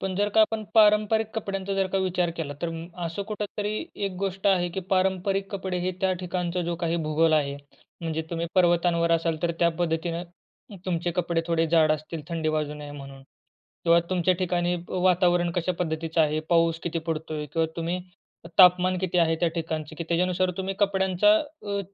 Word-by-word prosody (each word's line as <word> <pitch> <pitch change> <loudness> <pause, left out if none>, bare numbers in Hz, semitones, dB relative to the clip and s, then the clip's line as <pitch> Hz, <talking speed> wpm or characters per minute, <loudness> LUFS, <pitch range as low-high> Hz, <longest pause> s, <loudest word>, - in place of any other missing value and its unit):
पण 190 -1 -3
जर 205 +1 +2
का 220 +1 +3
आपण 215 0 +2
पारंपरिक 215 0 +4
कपड्यांचा 195 -2 -3
जर 195 -1 +1
का 195 - +2
विचार 180 -2 0
केला 145 -3 -4
तर 170 - 0
अ, 170 +2 -7
असं 170 +4 -3
कुठेतरी 210 0 -3 0.3
एक 195 - -4
गोष्ट 195 0 -2
आहे 180 -3 +3
की 190 - -4
पारंपरिक 190 +1 +1
कपडे 190 -2 -3
हे 180 +1 -1
त्या 190 -1 +2
ठिकाणचा 180 0 -2
जो 170 0 -2
काही 170 0 -1
भूगोल 160 +1 +3
आहे, 140 -2 +1 0.4
म्हणजे 160 -1 -2
तुम्ही 170 0 -2
पर्वतांवर 170 -2 +3
असाल 165 -1 +1
तर 170 - +2
त्या 170 - +4
पद्धतीनं 170 0 -1 0.6
तुमचे 175 -1 -1
कपडे 170 -1 +1
थोडे 165 -1 +1
जाड 160 -2 +5
असतील 155 +1 -5
थंडी 165 -2 -1
वाजू 150 -1 -1
नये 150 -1 -8
म्हणून 135 -1 -10 0.6
किंवा 170 0 +6
तुमच्या 185 0 +2
ठिकाणी 175 0 0
वातावरण 180 -1 +2
कशा 175 +1 0
पद्धतीचं 160 -1 -1
आहे, 155 0 +2
पाऊस 165 -1 +3
किती 170 -1 -2
पडतोय? 155 -1 -3
किंवा 160 +3 0
तुम्ही 170 +2 -2 0.6
तापमान 180 0 +6
किती 180 -1 0
आहे 165 -1 +3
त्या 175 - +3
ठिकाणचं 160 -2 -4
की 170 - -3
त्याच्यानुसार 180 +1 +1
तुम्ही 190 0 -3
कपड्यांचा 190 - +3
अ, 290 -10 -5
175 Hz, 180 wpm, -26 LUFS, 165-190 Hz, 0.6 s, किंवा